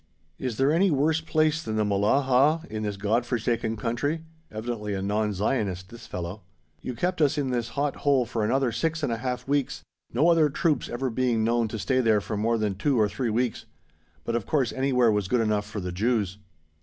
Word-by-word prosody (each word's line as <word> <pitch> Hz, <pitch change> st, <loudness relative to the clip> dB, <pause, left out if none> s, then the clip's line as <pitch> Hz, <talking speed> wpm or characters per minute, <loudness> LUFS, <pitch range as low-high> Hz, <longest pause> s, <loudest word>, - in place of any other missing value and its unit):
Is 125 Hz, -4 st, -3 dB
there 135 Hz, +2 st, +3 dB
any 190 Hz, +4 st, +4 dB
worse 155 Hz, +2 st, +2 dB
place 155 Hz, -1 st, +1 dB
than 110 Hz, -7 st, -4 dB
the 110 Hz, -1 st, +1 dB
Mellalah 130 Hz, +10 st, +3 dB
in 110 Hz, -, -3 dB
this 105 Hz, -2 st, -3 dB
God 105 Hz, +4 st, +1 dB
forsaken 115 Hz, -2 st, -1 dB
country? 125 Hz, +9 st, -2 dB, 0.3 s
(Evidently 110 Hz, -2 st, -4 dB
a 95 Hz, -, -3 dB
non 105 Hz, +1 st, 0 dB
Zionist, 100 Hz, -2 st, -1 dB
this 115 Hz, +1 st, -12 dB
fellow!) 90 Hz, +3 st, -5 dB, 0.4 s
You 125 Hz, -, -5 dB
kept 180 Hz, +7 st, -1 dB
us 150 Hz, 0 st, +3 dB
in 135 Hz, -3 st, 0 dB
this 120 Hz, -1 st, -1 dB
hot 145 Hz, 0 st, 0 dB
hole 140 Hz, -3 st, +2 dB
for 115 Hz, -1 st, -2 dB
another 130 Hz, +3 st, +1 dB
six 160 Hz, +7 st, -1 dB
and 125 Hz, -, +1 dB
a -, -, -2 dB
half 125 Hz, +2 st, -4 dB
weeks, 140 Hz, -1 st, -1 dB, 0.3 s
no 140 Hz, +8 st, +3 dB
other 165 Hz, -3 st, +4 dB
troops 155 Hz, +1 st, 0 dB
ever 130 Hz, +1 st, -2 dB
being 120 Hz, -2 st, +1 dB
known 115 Hz, 0 st, +2 dB
to 110 Hz, -, -5 dB
stay 130 Hz, +5 st, +1 dB
there 110 Hz, -3 st, +3 dB
for 105 Hz, +2 st, -5 dB
more 115 Hz, +3 st, +1 dB
than 105 Hz, -2 st, 0 dB
two 125 Hz, +6 st, +1 dB
or 105 Hz, -, +4 dB
three 120 Hz, +3 st, -2 dB
weeks 120 Hz, +2 st, -1 dB, 0.6 s
but 115 Hz, -, -2 dB
of 115 Hz, -4 st, -2 dB
course 135 Hz, -7 st, +1 dB
anywhere 125 Hz, -3 st, +3 dB
was 105 Hz, -3 st, 0 dB
good 125 Hz, +5 st, +2 dB
enough 105 Hz, -2 st, 0 dB
for 105 Hz, 0 st, -5 dB
the 90 Hz, -1 st, -4 dB
Jews." 105 Hz, 0 st, 0 dB
120 Hz, 210 wpm, -26 LUFS, 105-135 Hz, 0.6 s, any